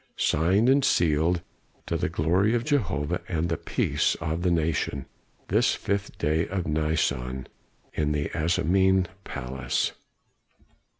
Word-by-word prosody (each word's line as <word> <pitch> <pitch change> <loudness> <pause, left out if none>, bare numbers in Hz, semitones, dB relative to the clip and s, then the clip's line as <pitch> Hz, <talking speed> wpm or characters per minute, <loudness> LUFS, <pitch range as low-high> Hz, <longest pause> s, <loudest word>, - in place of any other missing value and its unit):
Signed 95 +9 +2
and 135 +1 +4
sealed, 85 - +2 0.4
to - - -2
the - - 0
glory 95 +8 +2
of 120 - 0
Jehovah 95 - 0
and 85 -1 -1
the 80 - +1
peace - - 0
of 80 +2 -3
the 90 - +2
nation, 80 -5 0 0.4
this - - +3
fifth 100 0 -3
day 80 +2 +1
of 95 -2 -3
Nisan, 70 -5 -1 0.5
in 75 -1 0
the 75 -1 -1
Asmonean 90 +4 +2 0.2
Palace." 65 -3 -2
80 Hz, 125 wpm, -26 LUFS, 75-95 Hz, 0.5 s, and